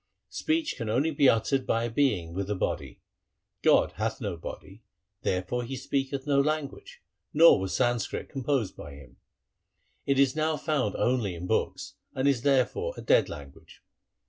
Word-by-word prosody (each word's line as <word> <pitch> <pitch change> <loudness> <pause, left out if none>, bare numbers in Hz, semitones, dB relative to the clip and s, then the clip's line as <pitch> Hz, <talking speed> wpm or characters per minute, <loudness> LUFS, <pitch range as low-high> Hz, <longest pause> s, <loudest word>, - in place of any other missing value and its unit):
Speech 315 0 -1
can 115 -4 -4
only 135 +9 +1
be 140 -3 +4
uttered 130 +4 +1
by 115 0 +1
a 120 - -1
being 105 -11 +1
with 95 +2 -3
a 105 - 0
body. - - -3 0.6
God - - +4
hath - - -2
no - - -3
body, 95 +3 -9 0.4
there 90 0 0
fore 125 +6 -3
He 130 +3 -5
speaketh 135 +1 -2
no 140 -2 +2
language, 155 - -4 0.3
nor 165 -5 +7
was 95 0 -3
Sanskrit 120 -3 0
composed 135 -5 -1
by 70 - -10
Him. 65 -2 -15 0.9
It 140 -1 +2
is 135 0 +3
now 155 0 0
found 140 -8 -1
only 120 -7 0
in 85 +1 -6
books, - - -2 0.2
and 130 +1 +1
is 135 -4 +2
therefore 145 - +1
a - - -6
dead - - +3
language. - - -12
130 Hz, 170 wpm, -28 LUFS, 105-145 Hz, 0.9 s, nor